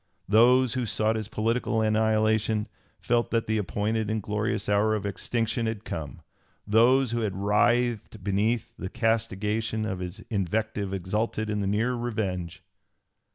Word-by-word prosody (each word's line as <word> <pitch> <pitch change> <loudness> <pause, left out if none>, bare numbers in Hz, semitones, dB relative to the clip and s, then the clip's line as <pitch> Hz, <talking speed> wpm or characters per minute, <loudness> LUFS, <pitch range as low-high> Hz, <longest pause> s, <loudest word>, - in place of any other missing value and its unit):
Those 120 +4 +5
who 125 -2 -1
sought 110 +2 +1
his 110 -2 -3
political 115 +1 0
annihilation 110 0 +2 0.3
felt 120 0 +1
that 115 -1 0
the 110 0 0
appointed 105 +2 -1
and 110 0 0
glorious 105 +1 -2
hour 105 +1 +3
of 105 -2 -4
extinction 115 +3 -1
had 110 -1 -4
come; 75 -3 -6 0.4
those 120 +4 +4
who 120 - 0
had 105 -4 -2
writhed 110 +1 +1
beneath 105 +3 0
the 95 - -5
castigation 110 0 -1
of 95 -4 -3
his 90 +1 -6
invective 100 0 -1
exulted 105 +3 -2
in 105 -1 -1
the 100 - -1
near 110 +5 +1
revenge. 105 -8 -3
110 Hz, 145 wpm, -27 LUFS, 105-115 Hz, 0.4 s, Those